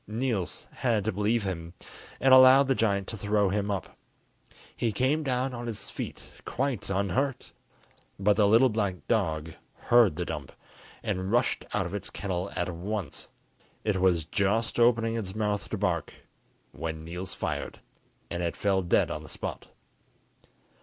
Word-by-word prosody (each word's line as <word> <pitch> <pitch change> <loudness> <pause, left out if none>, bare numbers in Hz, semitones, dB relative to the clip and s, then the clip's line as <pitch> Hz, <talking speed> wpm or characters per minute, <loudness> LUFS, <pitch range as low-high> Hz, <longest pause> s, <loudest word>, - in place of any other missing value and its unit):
Niels 110 -4 -2
had 115 -5 +1
to 110 - +1
believe 105 +3 +1
him, 85 -3 -5 0.4
and 135 0 +5
allowed 130 +1 +8
the 135 - +3
giant 100 -5 +1
to - - -3
throw 105 0 +1
him 100 +1 -1
up. 100 -4 -3 0.8
He 115 - 0
came 130 +8 +1
down 130 -2 -1
on 120 0 -5
his 110 -3 -4
feet - - -7
quite 130 -5 -2
unhurt, 100 +8 -1 0.7
but 100 +1 +3
the 105 -1 +4
little 115 +5 +6
black 100 -5 -2
dog 80 -7 0 0.2
heard 120 -9 +4
the - - -2
dump, - - -6 0.5
and 95 +1 -2
rushed 120 +1 +1
out 100 -2 0
of 85 - -6
its 100 - -4
kennel 95 0 -3
at 90 - -1
once. 100 +3 -5 0.5
It 100 -4 0
was 90 -4 +3
just 100 +8 0
opening 115 -1 +3
its 100 -4 -4
mouth 105 -2 -1
to - - -2
bark, - - -1 0.6
when 80 -1 -5
Niels 90 +3 -5
fired, - - -4 0.5
and 85 - -2
it 85 -1 -2
fell 100 -2 +2
dead 85 - +2
on - - -4
the - - -11
spot. - - -6
105 Hz, 160 wpm, -28 LUFS, 95-115 Hz, 0.8 s, allowed